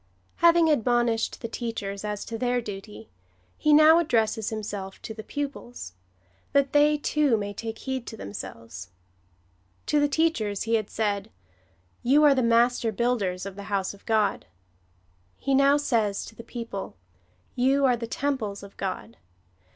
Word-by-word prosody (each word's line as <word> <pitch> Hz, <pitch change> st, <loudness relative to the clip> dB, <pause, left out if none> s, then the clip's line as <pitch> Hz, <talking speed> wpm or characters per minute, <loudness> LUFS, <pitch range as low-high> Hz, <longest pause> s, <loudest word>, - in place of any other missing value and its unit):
Having 340 Hz, -1 st, +5 dB
admonished 240 Hz, -3 st, +1 dB
tlie 230 Hz, -, -4 dB
teachers 205 Hz, -5 st, -4 dB
as 210 Hz, -1 st, -4 dB
to 230 Hz, -, -6 dB
their 245 Hz, +1 st, 0 dB
duty, 195 Hz, -, -8 dB, 0.4 s
he 305 Hz, -, +1 dB
now 310 Hz, +2 st, +8 dB
addresses 225 Hz, -8 st, +1 dB
himself 205 Hz, -3 st, -5 dB
to 220 Hz, -, -6 dB
the 220 Hz, -, -8 dB
pupils 270 Hz, -, -6 dB, 0.3 s
— 90 Hz, +1 st, -37 dB
that 280 Hz, -1 st, +2 dB
they, 295 Hz, +1 st, +5 dB
too, 290 Hz, -4 st, +2 dB
may 205 Hz, -1 st, -4 dB
take 225 Hz, +2 st, -6 dB
heed 260 Hz, -2 st, -4 dB
to 220 Hz, -, -7 dB
themselves. 115 Hz, -, -8 dB, 1.0 s
To 300 Hz, -, +2 dB
the 290 Hz, -, +3 dB
teachers 280 Hz, -10 st, 0 dB
he 230 Hz, -, -2 dB
had 215 Hz, -2 st, +1 dB
said, 205 Hz, -2 st, -1 dB, 0.4 s
" -, -, -38 dB, 0.3 s
You 280 Hz, +5 st, +4 dB
are 290 Hz, -2 st, +7 dB
the 260 Hz, -, +1 dB
master 235 Hz, 0 st, +3 dB
builders 205 Hz, -5 st, -1 dB
of 195 Hz, -1 st, -7 dB
the 200 Hz, 0 st, -8 dB
house 195 Hz, -2 st, -1 dB
of 200 Hz, -, -17 dB
God." 215 Hz, -2 st, +1 dB, 0.9 s
He 275 Hz, -, -1 dB
now 275 Hz, +1 st, +5 dB
says 225 Hz, -8 st, 0 dB
to 225 Hz, -, -12 dB
the 230 Hz, -, -10 dB
people, 230 Hz, -, -6 dB, 0.3 s
" 90 Hz, 0 st, -38 dB
You 275 Hz, 0 st, +3 dB
are 250 Hz, -2 st, +4 dB
the 230 Hz, -1 st, -5 dB
temples 230 Hz, -7 st, -2 dB
of 200 Hz, -, -12 dB
God. 185 Hz, -, -5 dB
230 Hz, 165 wpm, -26 LUFS, 200-270 Hz, 1.0 s, now